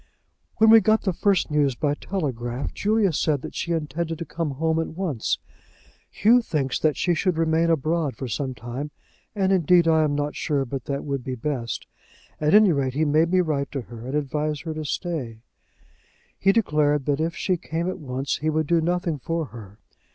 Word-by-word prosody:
"When 220 Hz, 0 st, +6 dB
we 225 Hz, 0 st, +9 dB
got 220 Hz, 0 st, +3 dB
the 190 Hz, -, 0 dB
first 190 Hz, -2 st, +1 dB
news 145 Hz, -3 st, +2 dB
by 145 Hz, +3 st, 0 dB
telegraph, 130 Hz, -8 st, -3 dB
Julia 210 Hz, -3 st, +1 dB
said 145 Hz, -2 st, 0 dB
that -, -, -7 dB
she 170 Hz, -, -3 dB
intended 165 Hz, +1 st, -2 dB
to 165 Hz, -, -5 dB
come 160 Hz, -5 st, -3 dB
home 160 Hz, +2 st, +1 dB
at 165 Hz, -, -1 dB
once. 155 Hz, -, -1 dB, 0.7 s
Hugh 240 Hz, +4 st, +4 dB
thinks 140 Hz, -, -1 dB
that 155 Hz, -2 st, +1 dB
she 175 Hz, -, +2 dB
should 175 Hz, +1 st, 0 dB
remain 165 Hz, +1 st, +2 dB
abroad 160 Hz, -1 st, 0 dB
for 130 Hz, -, -5 dB
some 130 Hz, +3 st, -3 dB
time, 120 Hz, +6 st, -6 dB, 0.5 s
and 195 Hz, -2 st, +1 dB
indeed 175 Hz, -2 st, +4 dB
I 160 Hz, -1 st, +4 dB
am 145 Hz, -1 st, 0 dB
not 145 Hz, 0 st, -2 dB
sure 140 Hz, -3 st, -1 dB
but 135 Hz, 0 st, -5 dB
that 140 Hz, 0 st, -3 dB
would 140 Hz, -3 st, -3 dB
be 130 Hz, 0 st, -4 dB
best. 125 Hz, -2 st, -3 dB, 0.5 s
At 155 Hz, +4 st, +3 dB
any 210 Hz, -3 st, +7 dB
rate 135 Hz, -4 st, -1 dB
he 155 Hz, +2 st, +2 dB
made 155 Hz, +3 st, +3 dB
me 185 Hz, 0 st, +4 dB
write 145 Hz, -5 st, -1 dB
to 135 Hz, -, -2 dB
her, 120 Hz, 0 st, -10 dB
and 135 Hz, -, -3 dB
advise 150 Hz, +1 st, -1 dB
her 160 Hz, -2 st, -4 dB
to 155 Hz, 0 st, -5 dB
stay. 135 Hz, -9 st, -4 dB, 1.0 s
He 195 Hz, -, +4 dB
declared 150 Hz, -, +2 dB
that 145 Hz, -1 st, 0 dB
if 165 Hz, +1 st, -1 dB
she 185 Hz, +2 st, 0 dB
came 165 Hz, +1 st, -3 dB
at 185 Hz, -, -3 dB
once 135 Hz, -1 st, -3 dB
he 155 Hz, -, -1 dB
would 155 Hz, 0 st, 0 dB
do 170 Hz, +2 st, +2 dB
nothing 175 Hz, -2 st, -1 dB
for 165 Hz, +5 st, -2 dB
her. 105 Hz, -3 st, -11 dB
155 Hz, 200 wpm, -24 LUFS, 140-170 Hz, 1.0 s, we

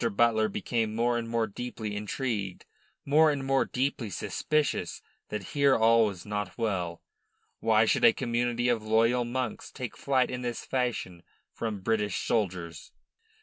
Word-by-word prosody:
Butler 110 Hz, 0 st, +3 dB
became 110 Hz, +1 st, -1 dB
more 120 Hz, +1 st, +2 dB
and 115 Hz, -1 st, -2 dB
more 115 Hz, -1 st, +1 dB
deeply 110 Hz, -1 st, -5 dB
intrigued, 105 Hz, -2 st, -3 dB, 0.4 s
more 155 Hz, +3 st, +5 dB
and 140 Hz, -2 st, -1 dB
more 135 Hz, 0 st, +2 dB
deeply 130 Hz, -3 st, -2 dB
suspicious 155 Hz, -, -1 dB, 0.3 s
that 105 Hz, -2 st, -5 dB
here 140 Hz, -2 st, +4 dB
all 115 Hz, 0 st, +5 dB
was 95 Hz, -4 st, -6 dB
not 105 Hz, -2 st, -4 dB
well. 90 Hz, -6 st, -2 dB, 0.6 s
Why 110 Hz, 0 st, +4 dB
should -, -, +1 dB
a -, -, +9 dB
community 120 Hz, 0 st, -1 dB
of 120 Hz, -2 st, +2 dB
loyal 115 Hz, +3 st, +2 dB
monks 125 Hz, -1 st, -3 dB
take 125 Hz, -4 st, -6 dB
flight 130 Hz, -2 st, +1 dB
in 125 Hz, 0 st, -4 dB
this 120 Hz, -2 st, -4 dB
fashion 120 Hz, -9 st, -2 dB, 0.3 s
from 110 Hz, -4 st, -4 dB
British 105 Hz, -2 st, 0 dB
soldiers? 90 Hz, -7 st, -2 dB
115 Hz, 145 wpm, -28 LUFS, 105-125 Hz, 0.6 s, a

